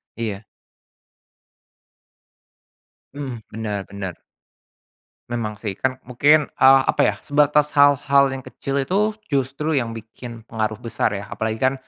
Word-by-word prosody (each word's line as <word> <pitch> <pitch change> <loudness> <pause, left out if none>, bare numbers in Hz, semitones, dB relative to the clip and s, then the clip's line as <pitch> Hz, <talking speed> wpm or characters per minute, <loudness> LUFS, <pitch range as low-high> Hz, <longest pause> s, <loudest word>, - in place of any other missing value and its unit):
Iya. 110 -2 -4 2.7
Hmm, 135 -4 -5
bener 105 -3 -4
bener. 95 -3 -6 1.2
Memang 110 -3 -2
sih, 105 -1 -4
kan 130 0 0
mungkin, 145 +4 +3
eee, 135 0 +6
apa - - +1
ya, - - 0
sebatas 150 +1 +3
hal-hal 140 -1 +5
yang 135 -1 -5
kecil 135 - -5
itu 210 +7 0 0.2
justru 140 +3 -1
yang 120 -6 -1
bikin 115 +1 -10
pengaruh 110 -1 -2
besar 110 -2 -1
ya, 100 +1 -7
apalagi 110 0 -2
kan 130 +1 +3
125 Hz, 120 wpm, -22 LUFS, 110-140 Hz, 2.7 s, eee